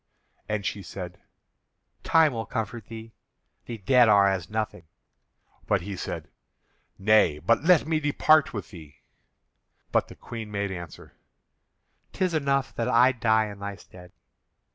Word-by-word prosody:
And 105 -2 -2
she 100 - -3
said: 90 0 -8 0.8
"Time 160 -4 +3
will 115 -2 -4
comfort 110 0 -4
thee; 115 0 -10 0.5
the 115 - -5
dead 120 +3 +4
are 100 -1 +6
as 95 -3 -1
nothing." 105 -6 -4 0.8
But - - +1
he 100 +3 -6
said: - - -6 0.7
"Nay, 105 -6 +3
but 105 - +1
let 170 -3 +5
me 160 0 0
depart 155 +1 +3
with 105 -7 -7
thee." 75 -5 -14 0.9
But - - +1
the - - -12
Queen 115 -2 -8
made 100 -1 -3
answer: 85 -4 -9 1.0
"'Tis 185 -3 -1
enough 140 -3 0
that 115 - -1
I 125 +1 +5
die 110 -3 +2
in 100 - -11
thy 100 0 -5
stead." 90 -2 -15
110 Hz, 140 wpm, -26 LUFS, 95-125 Hz, 1.0 s, are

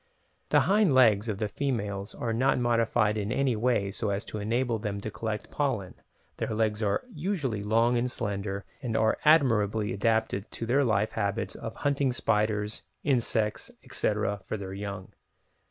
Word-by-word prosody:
The - - +5
hind 200 -7 +3
legs 110 -4 +5
of 105 - -2
the 105 0 -1
females 105 -5 -3
are 115 -2 -2
not 130 +4 +2
modified 115 -3 +2
in 105 +1 -2
any 130 -1 +1
way 110 -3 +1
so 105 +1 -2
as 100 +1 -2
to 105 - -5
enable 115 +2 0
them 100 -1 -3
to 110 - -5
collect 110 -1 -4
pollen, 130 -10 -1 0.4
their 110 - -2
legs 110 -1 0
are 100 -2 +1
usually 150 - -2
long 115 +4 +2
and 125 +1 0
slender, 100 -4 -3 0.2
and 120 -5 -3
they - - +3
are 110 - +2
admirably 110 -9 +4
adapted 110 -1 0
to 115 - -4
their 135 +5 +3
life 110 -3 +1
habits 100 -3 -2
of - - -7
hunting 140 -2 +1
spiders, 105 -3 0 0.2
insects, 115 -5 0 0.2
etc., 105 -1 -1
for 110 - -4
their 95 -2 -6
young. 100 -1 -6
110 Hz, 170 wpm, -28 LUFS, 105-125 Hz, 0.4 s, The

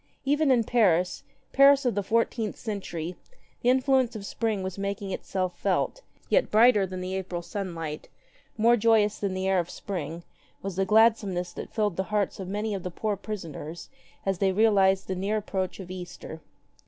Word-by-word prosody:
Even 290 +2 +2
in 245 -3 +4
Paris, 185 -7 +2 0.3
Paris 275 0 +6
of 245 - +2
the 205 - 0
fourteenth 225 +1 0
century, 185 -6 -5 0.5
the 245 - +2
influence 260 -2 +3
of 205 -2 -6
Spring 215 -3 -2
was 190 +1 -5
making 200 0 -3
itself 185 -1 -3
felt: 200 - 0 0.3
yet - - +2
brighter 215 -2 +5
than 185 0 -6
the 185 +1 -4
April 185 -2 -4
sunlight, 165 -6 -5 0.5
more 230 +2 +5
joyous 220 -2 +3
than 195 -2 -2
the 190 0 -1
air 190 -1 +3
of 170 - -2
Spring, 170 -3 -5 0.4
was 195 -2 -4
the 195 +1 +1
glad 220 +3 +6
someness 180 -4 -4
that - - -7
filled 210 -5 0
the 190 - 0
hearts 210 -2 0
of 190 - -5
many 210 +2 -2
of 195 - -3
the 180 - -4
poor 210 +4 -2
prisoners 170 -6 -7 0.4
as 195 -2 0
they 195 -1 +3
realized 195 -2 +3
the 190 - -1
near 195 +4 -1
approach 190 -3 -3
of 185 -2 -8
Easter. 175 -3 -8
195 Hz, 180 wpm, -27 LUFS, 185-220 Hz, 0.5 s, Paris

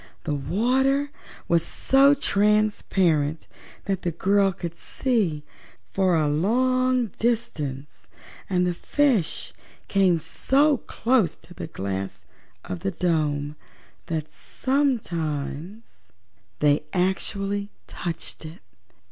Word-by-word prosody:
The 155 - -2
water 260 - +1 0.4
was 170 -1 +3
so 275 +2 +4
transparent 200 - +1 0.4
that 195 -2 -1
the 175 - -1
girl 195 +4 +2
could 170 -2 -6
see 185 - -1 0.5
for 185 -2 +3
a 155 -2 +2
long 250 +8 +2
distance 150 - -2 0.4
and 180 -2 +2
the 180 - 0
fishes 240 - 0 0.3
came 190 -3 +3
so 270 - +2
close 230 - +1
to 175 - -16
the - - -6
glass 95 -7 -5 0.4
of 90 - -5
the - - -1
dome 150 - 0 0.5
that 155 -2 -3
sometimes 180 - -2 0.6
they 145 0 +4
actually 195 +2 -1 0.2
touched 170 -2 -5
it. 160 +1 -10
185 Hz, 100 wpm, -25 LUFS, 155-235 Hz, 0.6 s, so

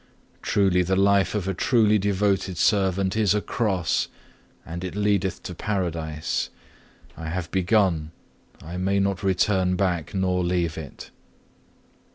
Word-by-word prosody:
Truly 95 -3 +2
the 95 +2 +1
life 100 +1 +3
of 100 -3 -2
a 95 - 0
truly 110 +2 +3
devoted 100 -2 0
servant 95 0 +2
is 105 -2 +3
a - - +2
cross, 95 - 0 0.6
but 85 +2 -6
it 90 +1 -5
leadeth 100 -3 0
to 90 - -6
paradise. 85 -6 -2 0.7
I 80 -1 -6
have 85 0 -4
begun; 95 -5 +2 0.5
I 85 +3 -6
may 95 +2 +1
not 100 -1 0
return 95 -1 +2
back 90 -3 -1
nor 90 -1 +1
leave 85 -2 0
it. 75 -4 -9
95 Hz, 135 wpm, -24 LUFS, 90-100 Hz, 0.7 s, life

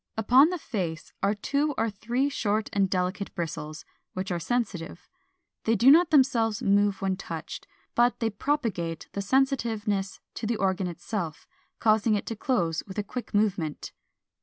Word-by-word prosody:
Upon 255 +8 +6
the 360 - -2
face 180 - -4
are 200 +2 +2
two 285 +7 0
or 225 - +1
three 235 +7 -1
short 215 -6 -1
and 195 -1 +2
delicate 185 +2 -2
bristles, 155 -3 -5 0.3
which 185 0 -4
are 175 - -1
sensitive. 195 -4 -3 0.6
They 225 - +3
do 240 +6 +7
not 340 +3 +6
themselves 255 -7 +3
move 200 0 +2
when 190 -1 0
touched, 165 -4 -7 0.3
but 240 +1 +3
they 225 -1 0
propagate 205 - -2
the 200 - -3
sensitiveness 220 -5 0
to 220 - -4
the 230 0 0
organ 190 -1 0
itself, 175 -1 -5 0.3
causing 215 0 +3
it 205 - -2
to 225 - -4
close 180 -9 0
with 190 - -9
a 210 - 0
quick 230 +1 -6
movement. 190 -8 0
205 Hz, 160 wpm, -27 LUFS, 185-240 Hz, 0.6 s, do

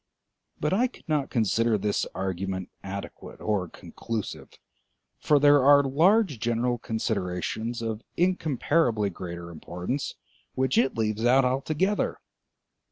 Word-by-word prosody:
But 150 +4 0
I 240 +6 +3
could 255 - -19
not 150 -3 0
consider 115 0 +2
this 105 0 -1
argument 95 0 -3
adequate 100 +1 -7
or 100 -5 -1
conclusive, 110 +4 -6 0.7
for 150 - +3
there 145 -1 +6
are 145 +1 +7
large 165 - +3
general 120 +1 0
considerations 110 +2 -2
of 110 -1 -3 0.2
incomparably 150 - +1
greater 85 -1 -7
importance 90 - -4 0.4
which 130 0 +1
it 135 - +2
leaves 110 0 -1
out 130 +2 +5
altogether. 155 +10 0
115 Hz, 115 wpm, -27 LUFS, 100-145 Hz, 0.7 s, are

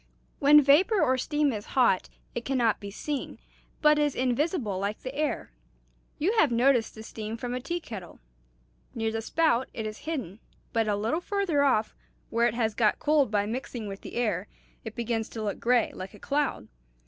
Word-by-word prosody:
When 295 +1 +7
vapor 350 - +5
or 260 -6 +3
steam 295 0 +1
is 210 -1 -6
hot, 235 -8 +3 0.2
it 240 - -4
can 270 +1 -1
not 230 -4 +2
be 200 - -7
seen, 280 +7 -4 0.5
but 300 0 +6
is 295 -2 +1
invisible 255 - 0
like 200 +2 -3
the 255 - -5
air. 295 - -2 0.7
You 370 +8 +1
have 295 - +4
noticed 240 -1 +3
the 220 - -9
steam 220 0 -6
from 245 +1 -4
a 250 - -2
tea 340 +7 -3
kettle. 210 - -9 0.8
Near 225 -1 -1
the 225 0 -2
spout 265 -1 +1
it 220 - -3
is 215 0 -5
hidden, 260 - -5 0.3
but 225 -1 +1
a 210 - +2
little 225 +12 -1
farther 390 -7 0
off, 225 -6 +2 0.4
where 235 +1 +3
it 235 - -2
has 225 -2 0
got 215 -1 +2
cooled 295 -4 +3
by 205 -1 +1
mixing 240 0 -4
with 195 0 -7
the - - -9
air, 215 -5 0 0.4
it 220 - -7
begins 230 -2 -2
to 220 - -5
look 205 -2 -3
gray, 240 -1 +2
like 185 +3 -8
a - - -14
cloud. 285 0 -1
240 Hz, 195 wpm, -28 LUFS, 215-290 Hz, 0.8 s, When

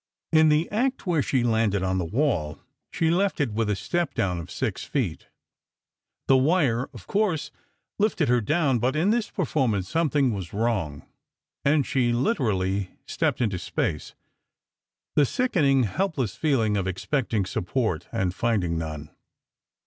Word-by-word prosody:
In 155 -1 +5
the 155 +2 +3
act 255 +5 0
where 170 -5 +2
she 130 -2 +1
landed 110 -4 +1
on 95 0 0
the 90 - -1
wall, 90 - -1 0.3
she 165 -1 +1
left 190 +2 +1
it 140 -6 +1
with 110 0 0
a 105 - +1
step 175 - -2
down 95 -7 0
of 85 - -8
six - - -3
feet. - - -3 1.0
The 135 - +6
wire, 135 -4 +2
of 115 -9 -12
course, 195 -7 0 0.5
lifted 205 -7 +2
her 125 -1 +3
down, 140 +1 +1
but 125 +5 0
in 175 +7 +2
this 230 -1 0
performance 130 - 0
something 145 -3 +1
was 95 -4 -6
wrong, 100 -10 -1 0.6
and 140 -1 +3
she 125 -3 +1
literally 100 - 0 0.2
stepped - - -1
into 105 -6 0
space. 75 -3 -3 1.0
The 150 - +5
sickening, 140 - +2
helpless 135 - -1
feeling 115 -9 +1
of 95 -2 -1
expecting 110 +2 -1
support 90 - -2
and 95 -6 -1
finding 95 -8 0
none! 75 -2 -6
120 Hz, 150 wpm, -25 LUFS, 100-155 Hz, 1.0 s, The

